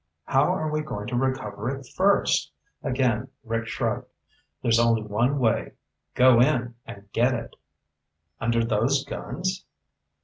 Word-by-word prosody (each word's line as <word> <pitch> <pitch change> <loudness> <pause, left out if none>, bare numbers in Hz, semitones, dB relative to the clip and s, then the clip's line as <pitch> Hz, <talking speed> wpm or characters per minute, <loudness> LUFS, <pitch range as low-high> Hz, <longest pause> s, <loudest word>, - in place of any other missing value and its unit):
"How 135 - +3
are 155 -4 -1
we 155 0 0
going 105 -9 -5
to 120 - -2
recover 130 -3 -1
it 135 0 -5
first?" 200 +2 +2 0.3
Again 130 -3 0 0.2
Rick 115 -1 -2
shrugged. - - -2 0.6
"There's 115 -1 +4
only 115 -2 +3
one 115 +7 +1
way. 115 -5 +1 0.4
Go 125 -1 +6
in 120 -3 +2
and 100 0 -10
get 125 +2 +3
it." 115 -1 -6 0.8
"Under 115 0 +1
those 120 +5 +1
guns?" 185 +2 -4
125 Hz, 135 wpm, -25 LUFS, 115-140 Hz, 0.8 s, Go